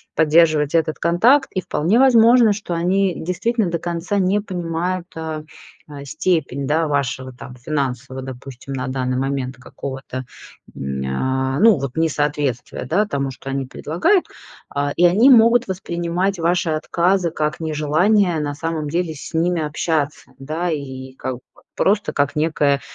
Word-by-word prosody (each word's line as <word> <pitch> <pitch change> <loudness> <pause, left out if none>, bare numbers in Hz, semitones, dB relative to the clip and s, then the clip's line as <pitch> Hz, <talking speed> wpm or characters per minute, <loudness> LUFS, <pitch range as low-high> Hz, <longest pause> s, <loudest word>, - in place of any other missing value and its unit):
поддерживать 155 -1 +3
этот 160 -1 +1
контакт. 235 - +3
И 185 - -1
вполне 180 +11 +1
возможно, 235 -3 +6
что 200 -4 -5
они 185 +2 +1
действительно 205 +4 -1
до 170 -1 -2
конца 175 +4 -2
не 195 +2 +2
понимают, 180 -1 -3
а, 160 -1 -5 0.6
степень, 140 -3 -1
да, 160 +2 +1
вашего 130 -2 -2
там 125 0 -11
финансового, 130 -1 -3
допустим, 130 +1 -8
на 130 0 -3
данный 130 -1 -2
момент 135 -2 -2
какого-то, 130 0 -7 0.5
м, 65 0 -4
а, 130 - -1
ну 220 -4 +6
вот 135 -2 -5
несоответствия, 145 -6 -1
да, 200 - +1
тому, 140 -6 -2
что 135 +1 -9
они 135 0 -2
предлагают. 180 - +1 0.4
А, 145 0 -2
и 175 - +4
они 215 +10 +5
могут 235 -1 +6
воспринимать 180 +1 -2
ваши 170 0 +1
отказы 170 +3 +1
как 155 +1 -2
нежелание 160 +4 +2
на 145 -1 -3
самом 160 -1 -3
деле 170 +1 -1
с 140 - -9
ними 170 +1 +1
общаться, 150 -2 -2
да, 155 +6 -3
и 130 -3 -6
как 130 -1 -4
бы 125 - -14 0.4
просто 205 +2 +1
как 145 +1 0
некое, 150 -3 +2
160 Hz, 145 wpm, -20 LUFS, 135-180 Hz, 0.6 s, возможно